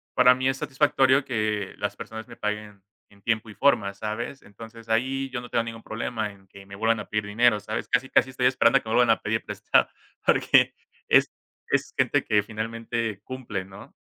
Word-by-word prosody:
para 125 0 +6
mí 130 +1 -1
es 135 - -1
satisfactorio 135 -1 +2
que 110 -5 -2
las 100 0 -3
personas 110 +2 -8
me 120 - -11
paguen 105 -1 -4 0.3
en 100 0 -22
tiempo 110 0 -1
y 105 - -11
forma, 115 -7 +3
¿sabes? 110 +6 -5
Entonces 115 +2 -13
ahí 135 +4 0
yo 125 -2 -3
no 120 - -10
tengo 115 - +1
ningún 115 0 -8
problema 110 -1 -3
en 95 -1 -19
que 100 +1 -14
me 100 - -10
vuelvan 115 +2 +1
a 105 - -6
pedir 105 -1 -1
dinero, 110 +1 +3
¿sabes? 110 +2 -4
Casi 125 +1 +1
casi 130 - +3
estoy 130 -1 -1
esperando 130 +1 +4
que 110 - -9
me 110 - +1
vuelvan 120 -2 +5
a 110 - +2
pedir 110 +2 -1
prestado, - - +1 0.4
porque - - +4 0.3
es - - +5 0.7
gente - - +2
que 105 -1 +2
finalmente 115 0 -4
cumple, 120 -8 -5
¿no? 95 +2 -13
110 Hz, 195 wpm, -25 LUFS, 105-125 Hz, 0.7 s, para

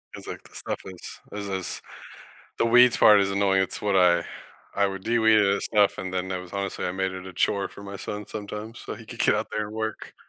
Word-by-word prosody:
It's, - - -10
like, - - -7
the - - -19
stuff - - -3
is 95 -2 -8
is 100 -1 -5
is 95 -1 -2 0.8
the 115 - +3
weeds 125 +1 +6
part 105 -2 +7
is 100 0 +1
annoying. 95 -1 +2
It's - - -3
what 100 -2 +1
I 85 -2 +4 0.5
I 100 0 +3
would 95 -1 -5
de-weed 110 -1 +4
and 100 -1 +3
stuff, 105 -2 +2
and 95 0 -4
then 95 0 -2
that 90 -1 -3
was 90 +1 -12
honestly, 100 -1 -3
I 90 - -2
made 95 0 -1
it 95 0 -7
a 95 - -8
chore 100 +2 0
for 100 - -12
my 100 0 -7
son 105 +1 -6
sometimes 105 +2 -7
so - - -6
he - - -12
could - - -10
get - - +4
out - - -2
there 105 -1 -2
and 105 - -9
work. 110 -1 -4
100 Hz, 245 wpm, -25 LUFS, 95-105 Hz, 0.8 s, part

